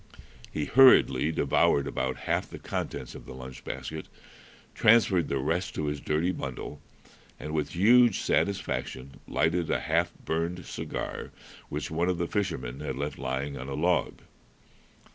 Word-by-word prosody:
He 75 - -2
hurriedly 80 - +6
devoured 70 -3 +2
about - - -2
half - - 0
the - - -8
contents - - -4
of - - -11
the - - -8
lunch 65 -1 -9
basket, 80 0 -6 0.7
transferred 105 -7 +4
the 70 - -1
rest 85 +9 -1
to 75 - -2
his 75 -1 -3
dirty 80 +4 +1
bundle, 70 -1 -6 0.6
and 75 +1 -6
with 75 -2 -1
huge 115 +4 +6
satisfaction 70 -8 -1
lighted 80 +4 +1
a - - +1
half - - +1
burned 85 +2 -2
cigar - - -5 0.4
which 75 0 -4
one 85 +3 +1
of 90 - 0
the 85 - 0
fishermen 80 - -2
had 75 - -4
left 70 +2 -4
lying 65 +2 -3
on 65 - -6
a 70 - -3
log. 85 +4 0
80 Hz, 150 wpm, -28 LUFS, 70-90 Hz, 0.7 s, hurriedly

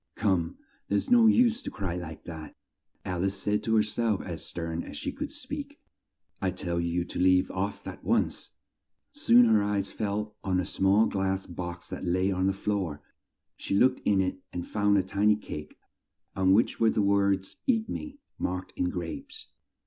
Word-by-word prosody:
"Come, 90 -4 0 0.3
there's 100 - 0
no 235 -2 +7
use 235 +1 +4
to - - -5
cry 95 -4 -3
like 80 -3 -7
that!" 80 -2 -8 0.5
Al 90 -1 -2
ice 95 0 0
said 105 +1 0
to 110 - +1
her 110 - +5
self 110 -1 0
as 85 -4 -5
stern 85 -1 -3
as - - -8
she - - -3
could - - -5
speak. - - -6 0.6
"I 95 - +1
tell 85 -1 -2
you 85 +1 0
to - - -6
leave 90 0 +4
off 100 +2 -3
at - - -8
once!" - - 0 0.6
Soon 120 +1 +5
her 110 -2 +4
eyes 100 -1 -1
fell 105 0 -2
on 95 -1 +1
a 90 - -1
small 95 +3 +3
glass 95 -1 -1
box 85 -1 -6
that - - -6
lay 95 +2 +1
on 95 0 +1
the - - +3
floor. 95 -7 -2 0.5
She - - -2
looked 130 +5 +4
in 100 -2 +3
it 95 0 -2
and 90 -1 -4
found 105 -1 +2
a 95 - +3
tiny 100 +3 +3
cake 75 -7 -8 0.6
on 95 0 +3
which 110 +4 +2
were 115 - +5
the 105 - +1
words 100 -1 +2
"Eat 225 -4 +2
me," 290 +3 -6 0.2
marked 90 +1 -3
in 90 - 0
grapes. 85 -2 -6
95 Hz, 185 wpm, -28 LUFS, 90-105 Hz, 0.6 s, no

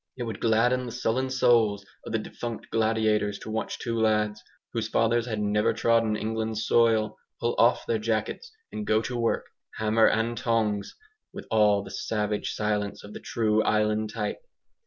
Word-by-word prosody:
It 125 - -3
would 110 -3 -5
'gladden 120 +3 +2
the - - -5
sullen 125 +2 -1
souls' 115 -6 +3 0.2
of - - -5
the 115 - +1
defunct 115 +1 -6
gladiators 110 -2 +1
to 110 - -8
watch 110 +1 -3
two 115 -1 -3
lads, 105 -1 +1 0.3
whose 115 -2 -1
fathers 115 +1 +1
had 110 -3 -2
never 105 0 +1
trodden 115 -2 +2
England's 110 0 -2
soil, 110 -2 +2 0.2
pull 120 +1 0
off 120 +2 +4
their 115 - 0
jackets 110 - -2 0.2
and 210 -1 -5
go 110 +1 +2
to 125 +3 -4
work 115 -1 0 0.3
"hammer 110 +1 +3
and 115 +2 +1
tongs," 110 -4 0 0.4
with - - -9
all 105 -2 +4
the - - -10
savage 105 -1 -2
silence 105 -1 -2
of 105 - -10
the - - -7
true 110 -1 +1
island 105 0 +1
type. 105 -2 -3
110 Hz, 170 wpm, -27 LUFS, 105-115 Hz, 0.4 s, off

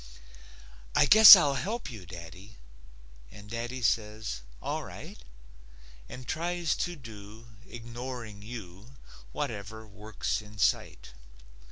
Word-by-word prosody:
"I - - +5
guess 215 +6 +11
I'll 150 -7 +2
help 215 - -4
you, 100 -7 -11
daddy." 90 +4 -12 0.7
And 105 +6 -14
daddy 120 +2 -5
says: 105 - -2 0.2
"All - - -4
right," - - -11 0.9
And 125 -1 -10
tries 170 -1 -2
to 175 -1 -3
do, 110 -3 -13 0.2
ignoring 120 -2 -8
you, 105 +1 -11 0.4
Whatever 110 - -6
work's 105 +1 -5
in 105 0 -15
sight. 95 - -1
110 Hz, 110 wpm, -28 LUFS, 105-130 Hz, 0.9 s, guess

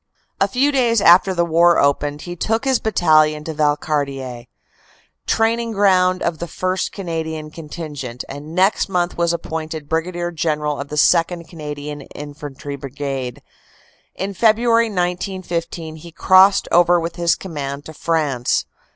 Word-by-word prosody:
A - - +3
few 270 +3 +1
days 240 -5 +2
after 190 0 +6
the 170 -2 +1
war 170 +1 +4
opened, 145 +1 +1
he 175 0 -6
took 225 +8 -1
his 265 -2 +2
battalion 155 -7 +3
to 160 - -5
Valcartier, 140 -5 -1 0.8
training 230 +1 +1
ground 185 -2 +3
of 165 -2 -1
the 170 - -4
First 185 +3 -2
Canadian 160 -4 -5
Contingent, 150 -6 -7
and 145 +4 -8
next 190 +2 +2
month 180 -2 0
was 170 -1 +1
appointed 160 -2 -5
Brig. 175 +2 -2
General 150 -2 -1
of 140 - -7
the 150 - -6
2nd. 170 +2 +2
Canadian 150 -2 -7
Infantry 145 -1 -7
Brigade. 135 -2 -5 0.7
In 195 +1 -4
February, 230 +3 +3
1915, 175 -4 -3
he 170 +2 -12
crossed 190 +3 +5
over 175 0 +5
with 165 0 -5
his 170 -1 +2
command 145 -5 -6
to 160 - -9
France. 150 -7 0
165 Hz, 140 wpm, -20 LUFS, 150-185 Hz, 0.8 s, after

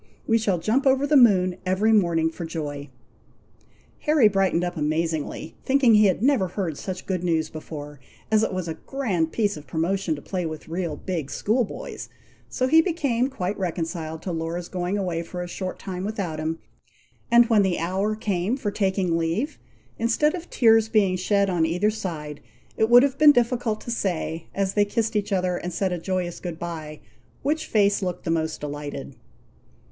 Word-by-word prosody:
We 225 0 +3
shall 200 -5 +1
jump 230 +11 +1
over 270 +1 +3
the 295 +1 +2
moon 185 -8 +5
every 190 +4 +2
morning, 170 -5 +3
for 170 - -7
joy." 150 -3 -5 1.1
Harry 300 -7 +4
brightened 190 -4 +1
up 175 0 -2
amazingly, 160 0 -2
thinking 265 -3 +4
he 210 0 +6
had 190 +3 0
never 260 -8 +3
heard 180 -3 -3
such 185 -1 -5
good 185 -2 -2
news 160 -3 0
before, 150 -2 -8 0.3
as 215 -1 +4
it 220 - 0
was 185 -2 -3
a 165 - -2
grand 180 - -2
piece 205 -4 0
of 145 -1 -11
promotion 165 +3 -1
to - - -8
play 185 -2 -3
with 155 -2 -6
real 170 -2 -3
big 165 -7 -4
school 235 +4 +1
boys; 205 - -7 0.4
so 255 - 0
he 320 +5 +6
became 280 -8 0
quite 200 -7 -3
reconciled 165 -3 -3
to 185 - -3
Laura's 165 +1 -4
going 180 +2 -2
away 180 -4 -1
for 180 +1 -6
a - - -6
short 185 +1 -5
time 185 -2 -6
without 195 -7 -3
him; 160 +1 -2 0.7
and 235 0 +7
when 225 -3 +4
the 190 -3 +1
hour 190 +6 -1
came 205 +2 -1
for 210 -7 -2
taking 190 -4 0
leave, 170 - -2 0.4
instead 235 +7 +2
of 350 -1 -7
tears 225 -2 +4
being 205 -5 +3
shed 200 +2 +1
on 175 -4 +1
either 180 +6 +1
side, 160 -9 -6 0.3
it 220 - +2
would 245 +1 +8
have 275 -1 0
been 305 -1 +9
difficult 240 -3 +1
to 235 - -6
say, 170 -6 -2
as 195 -1 0
they 205 - +4
kissed 225 +2 -1
each 205 0 -1
other 180 -2 +1
and 180 - -5
said 190 -2 0
a 175 - -3
joyous 180 0 -3
good 175 -3 -6
bye, 160 -3 -6 0.4
which 310 +3 -1
face 205 -2 +2
looked 180 -2 -3
the 165 - -1
most 160 -1 -1
delighted. 145 -2 -6
185 Hz, 185 wpm, -24 LUFS, 165-220 Hz, 1.1 s, been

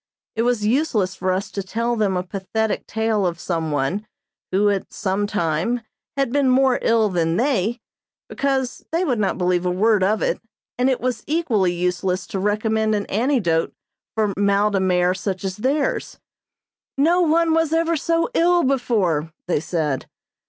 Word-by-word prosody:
It 225 - 0
was 235 -3 +1
useless 220 -6 +1
for 185 0 -1
us 190 +2 -2
to 200 - -3
tell 230 +5 -1
them 200 -4 +1
a 180 - -1
pathetic 205 +3 -2
tale 220 -2 0
of 170 -2 -1
some 165 -2 -2
one, 150 +9 -1 0.4
who, 200 +2 +3
at 195 -1 -3
some 200 0 -1
time, 205 +4 -1 0.4
had 275 -3 +1
been 280 -2 +3
more 260 0 +3
ill 225 -1 +3
than 170 -2 0
they, 235 -2 +1 0.5
because 265 -2 -1
they 335 +3 +1
would 250 -8 0
not 200 -2 0
believe 180 -1 +1
a 180 - 0
word 205 +3 +2
of 210 +3 +1
it, - - -1 0.4
and 255 +2 +3
it 260 - 0
was 250 0 -2
equally 245 - +1
useless 180 +1 -1
to 195 - -4
recommend 215 +2 +1
an 205 - -2
antidote 210 - +1 0.4
for 215 -2 +1
mal 200 +1 +2
de 195 - +1
mer 180 -1 +2
such 190 0 -4
as 190 -1 -3
theirs. 275 +6 -1 0.8
"No 335 +6 +3
one 330 0 +3
was 325 -1 +2
ever 330 +1 +2
so 330 +2 +1
ill 350 -3 +3
before," 205 - +1 0.2
they 175 - +1
said. 155 -4 -2
210 Hz, 170 wpm, -22 LUFS, 185-255 Hz, 0.8 s, who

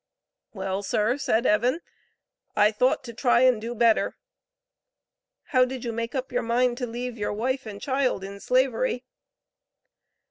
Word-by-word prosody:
"Well, 195 -2 -3
sir," 215 +6 0
said 235 -3 +1
Evan, 245 +8 +2 0.8
"I 210 +1 +5
thought 250 +6 +1
to 235 -2 -8
try 245 +1 +3
and 255 -4 +4
do 235 +2 -5
better." 230 -1 +2 1.3
How 255 -2 +4
did 255 -1 -4
you 235 - -2
make 230 +3 -4
up 260 0 -3
your 245 - 0
mind 240 +1 +1
to 250 - -2
leave 240 0 -5
your 205 - -1
wife 260 +4 -2
and 205 -1 -7
child 260 -6 0
in 200 +1 -8
Slavery? 255 +1 +1
240 Hz, 150 wpm, -25 LUFS, 220-255 Hz, 1.3 s, I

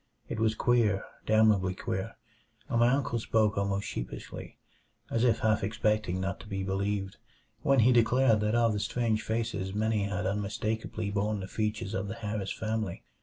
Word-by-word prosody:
It 115 - -4
was 110 0 +2
queer 115 -5 +2 0.2
damnably 105 -4 +4
queer 95 +4 -4 0.5
and 120 -5 0
my 120 +1 +5
uncle 130 -3 +1
spoke 110 -1 +2
almost 100 0 -1
sheepishly, - - -6 0.5
as 115 - +1
if 115 -3 +3
half 110 -3 +2
expecting 105 -3 0
not 95 +1 -2
to - - -11
be 95 -2 -3
believed, 95 +1 -2 0.4
when 135 -2 +4
he 120 +3 +5
declared 120 0 +4
that 105 +2 +1
of 115 -2 +3
the 105 - -1
strange 110 0 0
faces 110 -4 -2
many 110 -1 +1
had 100 -1 -2
unmistakably 105 +1 -2
borne 105 +1 0
the 95 - -5
features 105 -1 -2
of 95 0 -2
the 110 - -5
Harris 105 -3 -3
family. 110 -4 -3
110 Hz, 170 wpm, -30 LUFS, 100-115 Hz, 0.5 s, my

